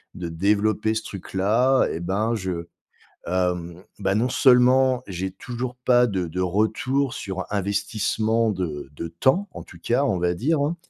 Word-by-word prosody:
de 90 -2 -5
développer 105 +5 +1
ce 110 - -2
truc-là 110 +7 +1
et 80 - -4
ben 105 +6 0
je 90 -4 -4 0.6
hem, 90 -1 -2 0.2
bah, 100 0 0
non 120 +4 +1
seulement 130 0 +4
j'ai 95 0 -4
toujours 120 +5 -6
pas 125 -1 +5
de 95 -4 -2
de 85 +3 -5
retour 125 - 0
sur 95 -1 -5
investissement 110 +2 0
de 80 -7 -4
de 85 - -5
temps, 130 - +1
en - - -8
tout 85 - -15
cas 120 +9 +1
on 95 -9 +1
va 90 0 +1
dire 145 - 0
hein 150 +4 0
105 Hz, 160 wpm, -24 LUFS, 90-125 Hz, 0.6 s, pas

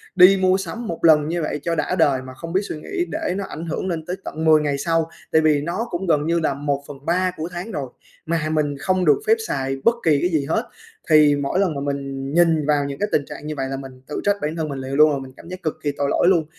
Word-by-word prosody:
đi 185 +1 +8
mua 185 0 +4
sắm 195 +5 -5
một 170 - -4
lần 150 -2 +6
như 170 +2 -1
vậy 150 - -2
cho 170 -1 0
đã 180 - -1
đời 135 -7 +3
mà 130 0 -10
không 165 +6 -8
biết 190 - +3
suy - - -5
nghĩ 355 - -2
để 315 - -2
nó 200 - -2
ảnh 160 +3 -6
hưởng 165 +3 -3
lên 165 -3 -3
tới 180 - -3
tận 160 +2 -4
10 155 -1 +6
ngày 145 -2 0
sau." 165 +2 0 0.2
Tại 160 - +4
vì 155 -2 +3
nó 175 +10 -3
cũng 180 +2 -3
gần 150 -3 +2
như 170 +1 +2
là 160 - 0
1/3 145 +5 -2
của 155 - -3
tháng 180 +5 -6
rồi 135 -8 -4 0.4
mà 160 -1 -1
mình 150 -2 0
không 185 +1 +1
được 405 - +5
phép 445 - +6
xài 135 0 -2
bất 230 - +4
kỳ 155 -4 +4
cái 175 - +2
gì 155 -5 0
hết. 165 +10 0 0.5
Thì 150 -2 +6
mỗi 140 +6 -1
lần 185 -6 +1
mà 140 - -3
mình 140 -1 -4
nhìn 165 -3 +3
vào 145 -1 +2
những 140 -1 -5
cái 205 - +1
tình 145 - +1
trạng 150 - -9
như 155 - -3
vậy 135 -1 -2
là 135 - -3
mình 135 -1 -10
tự 150 - -4
trách 205 0 +3
bản 150 +2 -2
thân 160 -2 -3
mình 140 -1 -4
liền 130 +1 -5
luôn, 145 -1 +4
mình 130 -1 -9
cảm - - -13
giác 185 0 -8
cực 155 - 0
kỳ 145 - +1
tội 140 0 0
lỗi - - +2
luôn, 175 -4 +4
155 Hz, 280 wpm, -22 LUFS, 140-175 Hz, 0.5 s, đi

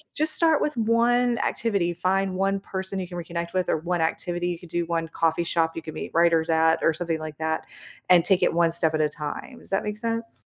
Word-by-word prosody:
Just 310 +1 +4
start 325 -3 +3
with 300 -4 -1
1 235 +2 +2
activity. 200 -7 0
Find 190 +2 0
1 195 +1 0
person 190 0 -4
you 185 - -4
can 175 0 -8
reconnect 170 0 -5
with, 185 -1 0
or - - +2
1 175 +1 -1
activity 175 +2 -1
you 175 -1 -4
could 175 - -13
do, 175 +1 -1
1 165 -1 -2
coffee 165 +1 0
shop 165 -1 0
you 165 - -4
could 160 -1 -8
meet - - -6
writers 165 -1 +3
at, 160 0 +4
or 165 - +4
something 165 0 -2
like 155 -1 -7
that, 160 0 -1 0.5
and 175 -2 +6
take 185 0 +2
it - - +3
1 170 0 +3
step 160 -1 +1
at 155 - +1
a 150 - +2
time, 150 - -6
does - - -9
that 195 - +1
make 210 0 -3
sense? 230 0 -4
175 Hz, 240 wpm, -25 LUFS, 165-195 Hz, 0.5 s, and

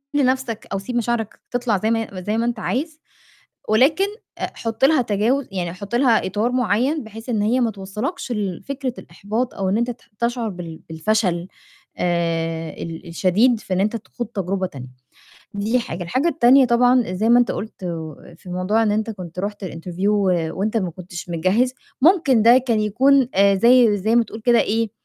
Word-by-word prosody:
لنَفْسك 260 -4 0
أو 195 - -1
سيب 240 +5 -6
مشاعرك 235 -2 -2
تطلع 245 -4 0
زي 220 +3 0
ما 225 0 +1
هي 185 -4 -9
زي 215 +2 0
ما 230 - 0
أنت 240 -2 -2
عايز 300 +7 -3 0.7
ولكن 285 - +4 0.3
آآ، - - -2
حُط 225 +3 0
لها 295 -2 +4
تجاوز 230 +6 0
يعني 175 -3 -3
حُط 200 +4 -6
لها 240 -6 +3
إطار 215 +6 -1
معيّن 250 +5 +1
بحيث 225 +3 -10
إن 215 -3 0
هي 240 +4 +2
ما 230 -2 +1
توصّلكش 210 - -5
لفكرة 240 +6 -3
الإحباط 220 +5 -4
أو 190 -2 -1
إن 205 - +1
أنت 240 +1 0
ت 240 - -13 0.2
تشعر 235 -1 -1
بال 170 -4 -8
بالفشل 175 +1 0 0.5
آآ، 165 -2 -1
ال 165 0 -8
الشديد 205 +8 +2
في 190 - -5
إن 185 - +1
أنت 215 +3 0
تخوض 235 +1 -7
تجربة 195 -3 -2
تانية. 130 -6 -9 0.7
دي 215 +5 +1
حاجة. 175 -5 -5
الحاجة 260 - 0
التانية 275 -3 +5
طبعًا 245 -3 +3
زي 215 +5 0
ما 240 +1 +6
أنت 245 - +2
قُلت 215 -2 -7
آآ 165 -1 -7
في 180 - -12
موضوع 185 +5 +1
إن 210 - +2
أنت 220 +2 -1
كنت 180 -4 -9
رُحت 205 0 -4
الinterview 180 +4 -3
و 185 -6 +1
وأنت 215 +3 -1
ما 185 -5 -2
كنتش 175 0 -9
مجهّز، 195 +10 +1 0.3
ممكن 305 - +4
ده 235 +3 +7
كان 235 -4 0
يكون 255 +5 +3
آآ 200 +1 +5
زي 235 0 +5
زي 220 +5 +1
ما 235 - +4
تقول 220 - -9
كده 240 +1 +4
إيه، 225 0 0
220 Hz, 185 wpm, -21 LUFS, 185-245 Hz, 0.7 s, ده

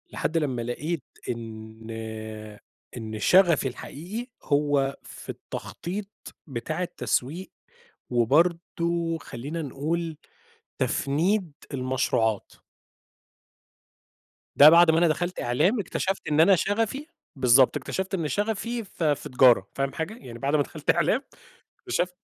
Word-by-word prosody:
لحد 160 - -2
لمّا 135 -6 0
لقيت 140 +6 -3 0.3
إن 110 -1 -7 1.1
إن 110 -2 -5
شغفي 175 - +5
الحقيقي 180 - -6 0.2
هو 145 -2 +1
في - - -12
التخطيط 170 - -6 0.4
بتاع 155 +6 -3
التسويق، 170 +1 -2 0.6
وبرضه 165 +6 +1
خلّينا 145 +8 -6
نقول، 155 +3 -3 0.6
تفنيد 170 +6 +1 0.2
المشروعات. 125 -5 0 2.0
ده 145 - +10
بَعد 170 0 +7
ما 160 - +2
أنا 170 +1 +5
دخَلت 175 +3 -1
إعلام، 175 - +2
اكتشَفت 190 0 -2
إن 150 0 +1
أنا 195 +4 +7
شغفي 225 - -1 0.3
بالضبط، 130 -1 +5
اكتشَفت 190 +1 -4
إن 170 -5 0
شغفي 225 +5 -2
في 160 -6 0
في - - -9
تجارة، 125 -6 +5
فاهم 135 0 -1
حاجة، 160 +5 -3
يعني 120 - -10
بعد 140 +4 0
ما 145 - +3
دخَلت - - -8
إعلام، - - +2 0.6
اكتشفت 180 0 -2
155 Hz, 115 wpm, -26 LUFS, 130-175 Hz, 2.0 s, ده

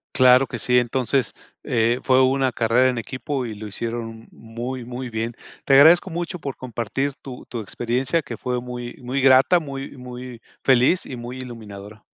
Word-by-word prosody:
Claro 130 -1 +6
que - - -5
sí, 125 0 +4
entonces, 125 +1 0 0.3
eh, 120 +1 +1
fue 130 0 +4
una 130 0 +2
carrera 120 +2 +3
en 125 - -2
equipo 130 +3 -4
y 115 - -5
lo 105 +1 -8
hicieron 115 +1 -5
muy, 120 +3 -6
muy 125 +1 -6
bien. 115 +1 -3 0.3
Te 135 - +5
agradezco 165 +7 +7
mucho 175 +1 -4
por 140 -4 -5
compartir 130 +3 -3
tu 130 -2 -9
tu 120 - -5
experiencia, 125 - -1
que - - -6
fue 125 -1 -2
muy 120 -1 -7
muy 130 +3 -1
grata, 135 +6 +6
muy 140 -3 -7
muy 125 -1 -9 0.2
feliz 130 +7 +4
y 130 - -7
muy 120 +1 -7
iluminadora. 105 -4 -10
125 Hz, 175 wpm, -22 LUFS, 115-135 Hz, 0.3 s, agradezco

